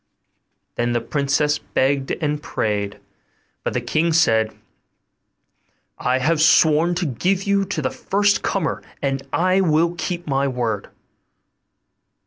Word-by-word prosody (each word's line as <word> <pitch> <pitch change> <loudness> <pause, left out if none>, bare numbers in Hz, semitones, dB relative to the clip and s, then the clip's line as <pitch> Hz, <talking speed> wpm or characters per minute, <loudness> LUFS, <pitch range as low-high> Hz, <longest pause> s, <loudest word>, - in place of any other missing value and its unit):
The 120 0 +1
princess 145 +4 0
begged 135 0 0
and 150 -2 -2
prayed; 105 -6 -2 0.6
but - - -2
the - - 0
king 165 +1 0
said, 110 -9 +3 1.5
'I 125 +1 +1
have 155 +4 +1
sworn 160 +2 +4
to 175 0 -1
give 180 +8 0
you 200 0 +1
to 180 -6 -3
the 130 - 0
first 205 +1 +1
comer, 190 -5 -1 0.2
and 135 -1 0
I 185 +2 +2
will 165 -1 +2
keep 175 0 -4
my 140 -1 0
word. 120 -6 -2
150 Hz, 120 wpm, -21 LUFS, 130-175 Hz, 1.5 s, sworn